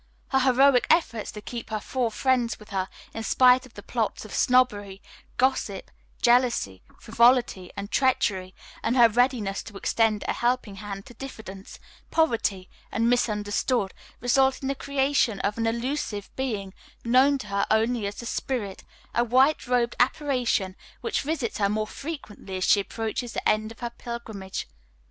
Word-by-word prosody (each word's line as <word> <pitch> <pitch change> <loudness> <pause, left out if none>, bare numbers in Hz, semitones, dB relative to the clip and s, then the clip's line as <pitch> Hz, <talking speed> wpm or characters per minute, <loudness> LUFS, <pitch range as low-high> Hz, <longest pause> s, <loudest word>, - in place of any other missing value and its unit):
Her 265 - +3
heroic 260 0 +4
efforts 235 -10 +2
to 210 - -8
keep 235 +2 -7
her 215 -1 -2
four 245 +2 -1
friends 245 0 +1
with 210 - -15
her 190 -1 -1 0.2
in 225 - -4
spite 250 +2 +4
of 240 - -25
the - - -9
plots - - -2
of - - -10
Snobbery, 205 -7 +2 0.4
Gossip, 245 -6 0 0.3
Jealousy, 240 - +3 0.2
Frivolity 235 -5 +3
and 200 +1 -5
Treachery, 195 -8 +1 0.3
and 235 +3 0
her 240 -1 +8
readiness 230 -4 +1
to 205 -3 -10
extend 220 0 +1
a - - +1
helping 240 -4 -1
hand 195 -1 -7
to - - -13
Diffidence, 215 -6 -9 0.3
Poverty 225 - +1 0.2
and 230 +3 +2
Misunderstood, 210 -2 0 0.3
result 265 +2 +2
in 265 - -1
the - - +1
creation 275 -6 +1
of 205 +3 -1
an 225 - +1
illusive 235 -3 -3
being 210 -8 -3 0.3
known 260 +4 +5
to 265 - -8
her 200 0 0
only 220 0 +2
as 200 - -5
the 235 - -8
Spirit, 225 -5 -3 0.3
a 240 - +3
white 260 +5 +3
robed 245 -1 +1
apparition 245 -8 +1 0.3
which 450 -4 -1
visits 275 -7 -2
her 200 -1 +2
more 215 +1 0
frequently 215 - -7
as 185 - -2
she 205 - +5
approaches 225 +3 -4
the - - -2
end 215 +1 +1
of 230 - -14
her 240 -1 -3
pilgrimage. 220 -6 -6
235 Hz, 160 wpm, -26 LUFS, 205-255 Hz, 0.4 s, her